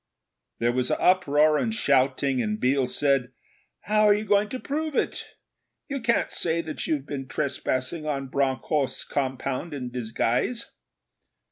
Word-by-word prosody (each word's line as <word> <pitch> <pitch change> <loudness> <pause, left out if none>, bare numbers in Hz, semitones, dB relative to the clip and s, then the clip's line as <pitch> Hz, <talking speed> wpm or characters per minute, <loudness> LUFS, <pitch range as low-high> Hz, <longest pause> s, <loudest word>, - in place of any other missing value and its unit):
There 120 +1 +1
was 125 0 0
uproar 155 -4 +3
and 225 - 0
shouting, 135 - +2
and 105 -1 -2
Biel 130 0 +2
said, 135 -2 +1 0.5
'How 215 0 +2
are 205 -1 +6
you 210 +1 -3
going 210 0 +3
to 255 - -4
prove 305 +2 -3
it? - - -2 0.5
You 275 -2 -3
can't 235 0 +1
say 170 -1 +1
that 160 -2 -5
you've 145 -4 -1
been 135 -2 -5
trespassing 140 +2 -2
on 135 -3 -2
Bronckhorst's 140 +1 0
compound 135 +3 -3
in 125 -3 -5
disguise!' 125 - -1
140 Hz, 140 wpm, -26 LUFS, 130-185 Hz, 0.5 s, are